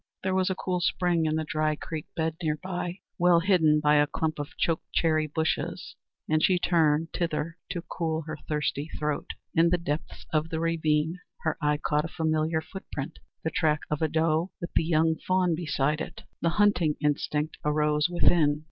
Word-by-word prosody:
There 190 0 0
was 185 0 +2
a 190 - 0
cool 180 -1 -1
spring 175 -2 +1
in 155 - +1
the 160 - 0
dry 155 0 0
creek 155 0 -6
bed 160 -1 -1
near 155 -2 0
by, 180 +1 -4 0.2
well 175 -1 +5
hidden 165 -4 +4
by 150 0 +4
a 145 0 +4
clump 155 +1 -2
of 145 - -6
choke 165 -2 +1
cherry 155 -2 +2
bushes, 160 +1 -2 0.3
and 155 0 +2
she 185 - +4
turned 165 -2 +2
thither 165 0 -2
to 175 -2 -4
cool 165 -2 -2
her 155 0 -6
thirsty 150 0 -1
throat. 150 -1 -2 0.3
In 165 +1 +4
the 180 - +3
depths 155 -3 -4
of 155 +1 +1
the 160 - -2
ravine 160 0 +1 0.2
her 155 - +1
eye 150 0 +2
caught 150 +1 0
a - - -2
familiar 160 -1 0
footprint 155 -5 -7 0.2
the 160 - -1
track 155 -1 +1
of 150 - -1
a 160 - +3
doe 160 +2 +1
with 170 - -6
the - - +3
young 160 0 +2
fawn 185 -2 +1
beside 150 -2 0
it. - - -7 0.2
The 170 - +2
hunting 190 -7 +3
instinct 150 +1 -1
arose 150 +1 +2
within. 160 -4 +3
160 Hz, 185 wpm, -27 LUFS, 150-170 Hz, 0.3 s, well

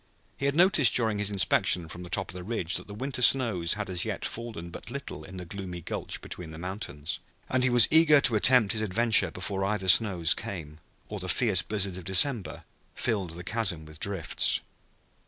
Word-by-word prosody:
He 140 - -2
had 140 - -1
noticed 170 -6 +4
during 110 -4 +1
his 105 0 +2
inspection 90 -3 +1
from 85 +2 -8
the 90 - -9
top 95 +1 -1
of - - -8
the 90 - -7
ridge 100 -3 -2
that - - -7
the 100 - -9
winter 130 +3 -4
snows 115 -10 +3
had 105 -1 -5
as 90 -2 -1
yet - - -4
fallen 110 -8 -6
but - - -10
little 140 +3 -7
in 95 0 -11
the 90 - -7
gloomy 90 -1 -7
gulch 85 - -5
between 90 -3 -8
the 80 - -10
mountains, 85 -4 -5 0.3
and 130 - 0
he 130 - +4
was 120 -3 +6
eager 160 -2 +6
to 120 - +4
attempt 115 0 +5
his 110 - -2
adventure 110 +3 +2
before 95 +1 -4
other 100 -1 -2
snows 90 -3 +4
came 80 -5 -8 0.3
or 105 - -6
the 95 0 -5
fierce 105 -6 +2
blizzards 100 -3 -2
of - - -11
December 95 - +1 0.3
filled 100 -8 -2
the 90 - -8
chasm 95 -6 -2
with 80 0 -10
drifts. 95 -5 +1
100 Hz, 205 wpm, -27 LUFS, 90-115 Hz, 0.3 s, was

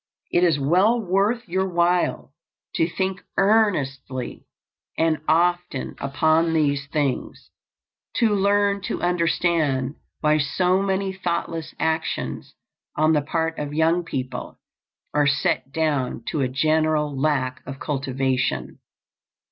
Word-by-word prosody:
It 175 - +3
is 165 -4 +4
well 185 - +3
worth 210 +4 0
your 190 +2 0
while 175 -4 +1 0.4
to 165 - +1
think 190 +2 -2 0.2
earnestly 145 - 0 0.5
and 160 -3 +1
often 175 -3 +1
upon 155 +4 +2
these 145 -3 +1
things; 145 -3 -2 0.6
to 225 -3 +3
learn 200 0 +2
to - - -3
understand 165 -6 +1 0.3
why 155 0 +3
so 180 +6 +1
many 195 0 -1
thoughtless 170 -3 -3
actions 160 0 -2 0.4
on 155 +1 +3
the 150 - +3
part 160 +2 -2
of 145 0 -4
young 165 +2 +2
people 130 -6 -5 0.5
are 145 -1 +3
set 140 -1 0
down 145 -7 -1
to 150 - -1
a 130 - +2
general 155 +1 +1
lack 135 -3 0
of 135 +1 -7
cultivation. 130 - -1
160 Hz, 115 wpm, -23 LUFS, 140-180 Hz, 0.6 s, is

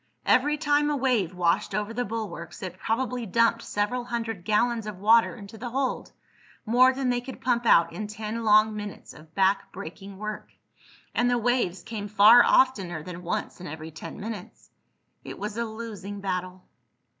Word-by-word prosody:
Every 295 +4 +3
time 295 -1 +2
a 295 - +1
wave 240 -10 +1
washed 180 +3 +1
over 210 +1 -2
the 245 +2 -1
bulwarks 205 -6 -6
it 185 - -6
probably 245 0 -2
dumped 230 +3 +2
several 235 +5 -2
hundred 225 -6 -4
gallons 220 +2 +1
of 210 -3 -6
water 225 +4 +4
into 210 -1 -11
the 245 +2 -5
hold—more 255 -1 0
than 260 -1 -1
they 245 0 0
could 260 +1 -9
pump 240 -1 0
out 170 -4 +5
in 210 +5 -5
ten 215 +2 -5
long 215 0 +5
minutes 210 -1 -7
of 155 +1 -17
back 195 +1 +2
breaking 195 +4 -9
work. 215 +1 -6 0.6
And 245 0 +2
the 245 - +2
waves 235 -6 0
came 220 -2 -5
far 215 +3 +7
oftener 190 -11 +2
than 180 +1 -8
once 175 +1 -4
in 180 - -7
every 160 +1 -7
ten 160 - -9
minutes. 210 -3 -8 0.5
It - - -8
was 210 +1 -5
a 235 +1 -1
losing 215 -3 -7
battle. 185 -1 -4
215 Hz, 170 wpm, -26 LUFS, 195-240 Hz, 0.6 s, far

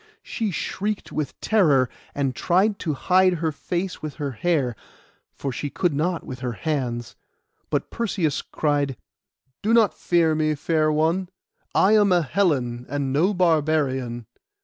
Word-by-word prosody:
She 220 -2 -2
shrieked 200 +4 -3
with 155 -2 -4
terror, 150 -12 +4 0.3
and 135 -3 -1
tried 200 +4 +2
to 155 -4 -2
hide 185 +5 +3
her 160 -2 -1
face 175 +4 -4
with 155 -2 -5
her 145 -3 -3
hair, 140 -3 0 0.6
for 140 - -4
she 145 +4 -4
could 175 +2 0
not 165 +4 -1
with 130 -1 -7
her 125 -2 -3
hands; 120 -5 -3 0.5
but - - -1
Perseus 190 -10 -1
cried— 145 -4 -1 0.6
'Do 225 +3 +3
not 225 -4 +4
fear 170 -2 +2
me, 155 0 +1
fair 155 +1 +1
one; 165 +4 +1 0.5
I 195 - +5
am 210 -2 +5
a 175 -2 +4
Hellen, 130 -7 0
and 140 -1 -2
no 170 +8 +3
barbarian. 150 - +1
155 Hz, 150 wpm, -24 LUFS, 140-180 Hz, 0.6 s, I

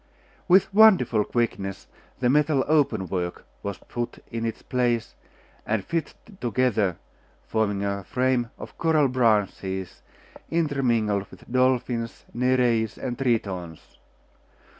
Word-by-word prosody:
With 190 +2 +4
wonderful 180 - +6
quickness 100 -5 -2 0.4
the 125 - +3
metal 145 +1 +3
open 140 -11 +2
work 90 0 -3 0.2
was 100 -2 -4
put 120 0 -5
in 115 -1 -2
its 115 - -6
place, 120 -3 0 0.5
and 110 -3 -1
fitted 165 -1 -3 0.2
together, 115 -7 +1 0.5
forming 105 -3 0
a 100 0 -2
frame 125 +2 0
of - - -10
coral 160 -4 +3
branches 105 -6 0 0.5
intermingled 120 -11 +1
with - - -14
dolphins, 125 -2 0
Nereids, 120 -3 +1
and 125 -2 -4
Tritons. 100 - -3
120 Hz, 110 wpm, -25 LUFS, 105-130 Hz, 0.5 s, wonderful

